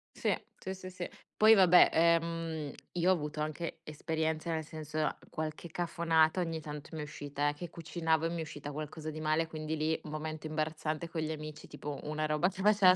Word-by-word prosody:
Sì, - - +2 0.2
sì, 190 - -4
sì, 185 -1 -8
sì. 180 -1 -5 0.3
Poi 220 +1 +8
vabbè, 180 -4 +8
ehm, 165 -2 +2 0.2
io 175 +1 +2
ho - - +7
avuto 150 -3 -3
anche 155 +2 -3
esperienza, 160 +1 -1
nel 160 -1 -1
senso 155 0 -2 0.2
qualche 155 +2 -4
cafonata 165 0 +2
ogni 165 -2 -1
tanto 150 -1 -8
m'è 155 - -3
uscita, 145 0 -2
eh, - - -1
che 170 +4 -7
cucinavo 165 -1 0
e - - +1
mi 170 0 -3
è - - 0
uscita 145 -2 -6
qualcosa 155 +1 -5
di 155 0 -6
male, 155 +1 +2
quindi 155 0 -3
lì 155 +1 +1
momento 155 0 -5
imbarazzante 155 +1 -2
con 165 -1 -2
gli 155 0 -1
amici, 155 -1 -7
tipo 145 -1 -6
una 155 +1 -1
roba 155 +4 +2
che 190 0 -7
faceva 200 -2 +7
160 Hz, 195 wpm, -33 LUFS, 155-170 Hz, 0.3 s, Poi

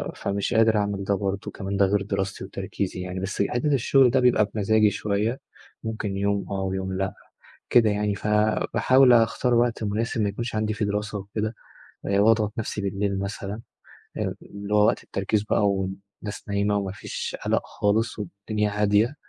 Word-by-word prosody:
فمش 100 +4 -2
قادر 110 -1 +4
أعمل 100 -1 -1
ده 100 +1 +1
برضه. 100 0 -3
كمان 100 0 -4
ده 100 - +5
غير 100 +1 +1
دراستي 100 -1 -3
وتركيزي 95 -1 -4
يعني 90 0 -4
بس 95 +2 -2
حتة 145 +4 0
الشغل 135 0 +4
ده 130 +2 +3
بيبقى 125 -4 +4
بمزاجي 110 +1 +4
شوية، 105 +4 -1 0.4
ممكن 110 -3 -3
يوم 100 0 0
آه 95 -1 -1
ويوم 95 0 -2
لأ 95 0 -1 0.6
كده 115 -3 +5
يعني، 105 0 0
فباحاول 110 +5 +3
أختار 120 +2 +3
وقت 120 -1 +1
مناسب، 110 +2 -1
ما 105 - +2
يكونش 115 +3 -4
عندي 110 0 0
فيه 105 - -1
دراسة 105 0 -2
وكده، 105 +3 -4 0.5
آآ 100 0 +2
وأضغط 105 0 +3
نفسي 105 -1 -3
بالليل 100 0 -1
مثلًا، 100 +2 -4 0.6
آآ - - -2
اللي 100 +1 -7
هو 105 0 +5
وقت - - 0
التركيز 100 +2 -1
بقى، 105 -1 +2
والناس 100 +2 -5
نايمة 100 +1 +1
وما 100 -2 -2
فيش - - -5
قلق - - +1
خالص 110 +3 0
والدنيا 105 +2 -2
هادية. 105 +6 +3
105 Hz, 170 wpm, -25 LUFS, 100-110 Hz, 0.6 s, ده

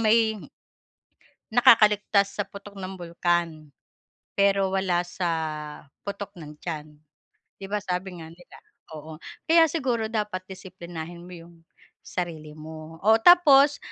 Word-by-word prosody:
may 220 0 +3 1.2
nakakaligtas 210 -4 +5
sa - - +3
putok 200 0 -11
ng 190 +1 -6
bulkan 170 -2 -1 0.7
pero, 195 -1 +2
wala 180 -2 +1
sa 175 0 -3 0.7
putok 200 0 -6
ng 150 0 -11
tiyan, 155 -2 -6 0.7
'di 195 - -7
ba, 210 - 0
sabi 185 -2 -4
nga 160 - -9
nila, 175 +1 -17 0.4
oo. 155 +1 -11 0.2
Kaya 325 0 +5
siguro 250 -8 -1
dapat 210 -4 -2
disiplinahin 175 -3 -9
mo 175 - -12
yung 170 +1 -15 0.5
sarili 155 -4 -6
mo, 155 +1 -10
o 220 +1 +5
tapos, 290 -3 +7
190 Hz, 120 wpm, -25 LUFS, 170-215 Hz, 1.2 s, tapos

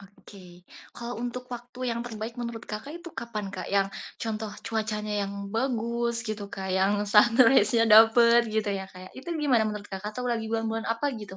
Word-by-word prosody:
Oke. 200 +1 -16 0.6
Kalau 240 0 -6
untuk 245 +1 -4
waktu 245 +1 -11
yang 235 - -2
terbaik 225 0 -6
menurut 235 -1 -5
Kakak 215 +8 -6
itu 345 - -9
kapan, 215 -3 -4
Kak? - - -5
Yang 195 -1 +4 0.4
contoh 220 -1 -3 0.2
cuacanya 215 -1 -2
yang 200 - -6 0.2
bagus 235 -1 0
gitu, 215 -1 -3
Kak, 190 -1 -5
yang 195 +2 +3 0.2
sunrise-nya 230 0 +6
dapet 235 +2 +7
gitu 215 -1 +1
ya, 190 - -5
kayak, 185 0 -11
itu 265 - -12 0.2
gimana 245 -6 +3
menurut 210 -1 -6
Kakak 200 +2 -5
atau 250 - -4
lagi 225 -2 -1
bulan-bulan 225 0 -2
apa 230 +5 -2
gitu? 200 -2 -9
225 Hz, 175 wpm, -27 LUFS, 210-235 Hz, 0.6 s, dapet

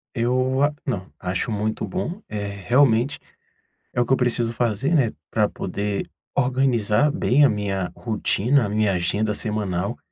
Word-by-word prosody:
Eu, 130 +3 +1
ah, 145 +1 +2
não, 95 - -3
acho 90 +5 -2
muito 110 +1 -1
bom, 185 +2 -4
eh, 105 -1 -3 0.2
realmente, 125 0 +3 0.7
é 120 - +1
o - - +2
que 125 - -4
eu - - +4
preciso 120 -2 0
fazer, 120 +5 0
né, 140 -7 +4 0.2
pra 105 -2 +2
poder 100 +2 -3 0.3
organizar 125 0 +2
bem 145 -3 +3
a - - +5
minha 95 -4 -2
rotina, 115 +3 +1
a - - -3
minha 105 -1 +1
agenda 100 +5 0
semanal, 105 -1 -1
115 Hz, 155 wpm, -23 LUFS, 105-130 Hz, 0.7 s, a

